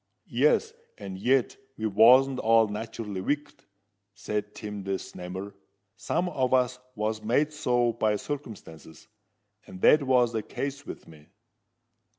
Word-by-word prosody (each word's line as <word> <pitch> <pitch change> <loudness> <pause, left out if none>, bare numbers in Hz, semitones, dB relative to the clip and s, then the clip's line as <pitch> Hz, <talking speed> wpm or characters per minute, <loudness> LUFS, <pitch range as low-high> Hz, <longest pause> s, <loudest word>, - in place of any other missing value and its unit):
"Yes:—and 455 - -1
yet 130 +3 +1 0.2
we 110 - -3
wasn't 125 +6 +5
all 115 0 +4
nat'rally 105 -2 -5
wicked," 145 +8 -3 0.5
said 105 0 -4
Tim 105 -2 -6
the 95 0 -2
Snammer. 95 +3 -8 0.4
"Some 180 - -1
on 130 -7 -1
us 125 0 +1 0.2
was 110 0 -2
made 140 +8 +1
so 120 -5 +1
by 110 -2 +1
circumstances; 100 - -8 0.6
and 95 - -10
that 155 - +6
was 125 -3 +2
the 110 - -1
case 140 +5 -5
with - - -9
me." 75 -2 -16
115 Hz, 130 wpm, -27 LUFS, 105-135 Hz, 0.6 s, that